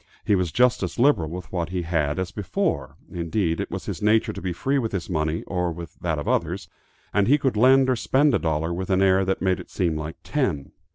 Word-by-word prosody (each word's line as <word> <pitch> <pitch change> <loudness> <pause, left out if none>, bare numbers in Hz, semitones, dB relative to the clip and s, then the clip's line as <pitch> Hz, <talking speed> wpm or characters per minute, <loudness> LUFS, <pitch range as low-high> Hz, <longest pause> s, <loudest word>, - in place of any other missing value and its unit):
He - - +3
was 90 -4 +1
just 125 +4 +3
as 90 -3 -3
liberal 120 - +3
with 90 +2 -7
what 85 -3 -2
he 90 -1 -2
had 80 -3 0
as 95 -2 -2
before, - - -2 0.2
indeed 85 0 -1
it - - -3
was - - -5
his - - -5
nature 105 +2 +3
to - - -7
be 95 - -2
free 135 +11 0
with 115 -4 -3
his 95 -1 -3
money 80 0 -1
or 90 -2 -1
with 85 0 -9
that 80 -3 -1
of 75 - -5
others, - - -1 0.5
and 100 -1 +3
he 145 +4 +5
could 135 -5 0
lend 130 +4 +5
or 130 - +2
spend 135 +4 +2
a - - +3
dollar 80 0 -1
with 95 +2 -4
an 95 0 +3
air 95 0 +4
that 95 0 -1
made 95 -1 +1
it - - -10
seem 85 -5 0
like 80 +1 -5
ten. 95 - -1
90 Hz, 240 wpm, -24 LUFS, 85-110 Hz, 0.5 s, he